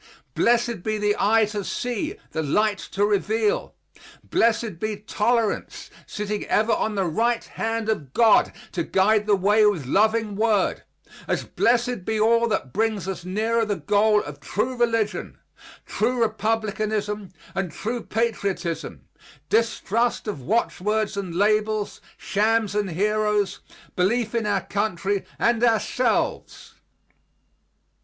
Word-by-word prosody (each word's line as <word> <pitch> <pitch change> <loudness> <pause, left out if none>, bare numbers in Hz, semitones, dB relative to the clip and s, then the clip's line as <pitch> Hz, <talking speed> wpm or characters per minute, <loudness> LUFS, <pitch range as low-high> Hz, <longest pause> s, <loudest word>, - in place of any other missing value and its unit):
Blessed 235 -3 +2
be 215 +3 -1
the 210 0 +1
eye 220 +2 +4
to 210 -1 -4
see, 245 - -3 0.2
the 160 - -2
light 205 +7 +1
to 200 +1 -1
reveal. 210 +1 0 0.5
Blessed 225 -5 +1
be 215 +1 -2
Tolerance, 220 +2 -1 0.2
sitting 210 0 -3
ever 220 +2 +2
on 215 - -1
the 195 -2 +1
right 230 +8 +1
hand 225 0 -3
of 155 -12 -2
God 225 - +4 0.2
to 175 - -2
guide 210 +5 +2
the 205 - +5
way 205 +3 +3
with 180 -10 0
loving 215 - +2
word, 215 -2 +1 0.5
as - - 0
blessed 240 -3 +1
be 220 +3 -1
all 230 +2 +4
that 170 - -2
brings 215 -4 0
us 190 -3 -4
nearer 220 +5 0
the 210 -2 -1
goal 205 +5 +2
of 145 -1 -9
true 220 - -2
religion, 230 -3 -1 0.5
true 245 +3 -1
Republicanism, 215 -2 -1 0.2
and 190 -3 -2
true 230 +8 -4
patriotism, 180 - -2 0.4
distrust 230 +1 0
of 200 -10 -4
watchwords 210 - 0
and 190 -4 -4
labels, 215 +1 +1 0.2
shams 215 0 +1
and 205 -2 0
heroes, 210 +2 0 0.4
belief 220 +5 +1
in 230 -2 0
our 200 -2 +1
country 200 -1 -1
and 235 0 +2
ourselves. 230 +1 0
215 Hz, 130 wpm, -24 LUFS, 200-225 Hz, 0.5 s, the